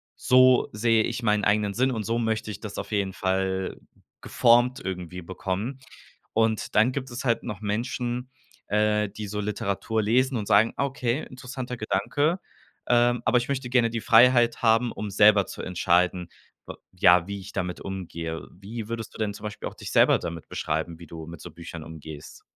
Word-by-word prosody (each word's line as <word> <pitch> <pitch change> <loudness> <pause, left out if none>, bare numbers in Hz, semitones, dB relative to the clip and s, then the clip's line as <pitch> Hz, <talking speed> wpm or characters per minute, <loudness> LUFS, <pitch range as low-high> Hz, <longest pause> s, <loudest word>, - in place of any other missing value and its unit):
so 130 0 +5
sehe 110 +1 +3
ich 120 +2 -3
meinen 105 -1 +2
eigenen 105 -1 +2
Sinn 130 +2 +2
und 110 -3 -3
so 115 +3 -1
möchte 110 -1 -1
ich 100 - -8
das 105 -2 -7
auf - - -7
jeden 100 -2 -1
Fall 95 0 -1 0.4
geformt 120 +2 +3
irgendwie 90 -1 -5
bekommen.“ 95 +8 -4 0.5
Und 110 -1 0
dann 110 +4 +5
gibt 130 -2 -4
es 125 +3 -5
halt 115 -2 +1
noch 105 0 -6
Menschen, 120 +4 -2 0.4
äh, 105 0 +1
die 105 +1 -7
so 105 +1 -4
Literatur 105 +1 -2
lesen 125 +4 +2
und 105 - -4
sagen: 110 +3 +4
„Okay, 135 -1 -1
interessanter 125 -1 -6
Gedanke, 145 - 0 0.5
ähm, 120 0 +3
aber 125 - +4
ich 120 - -4
möchte 130 -2 -2
gerne 120 -2 +3
die 115 0 -3
Freiheit 120 +1 +5
haben, 115 +1 +3
um 105 0 -5
selber 105 -1 +5
zu - - -7
entscheiden, 90 0 +1 0.4
w - - -6 0.2
ja, 90 -1 +5
wie 100 0 -5
ich 100 +1 -11
damit 90 -2 -3
umgehe.“ 85 -4 -5
Wie 105 +4 -8
würdest 115 -1 -5
du - - -9
denn 105 -2 -1
zum 105 - -10
Beispiel 105 - -5
auch - - -17
dich - - -8
selber - - +5
damit 85 -1 -6
beschreiben, 80 +2 -3
wie 85 - -11
du 80 0 -8
mit 85 -2 -10
so 85 - -8
Büchern 85 0 -9
umgehst? 80 -2 -10
105 Hz, 185 wpm, -26 LUFS, 95-120 Hz, 0.5 s, so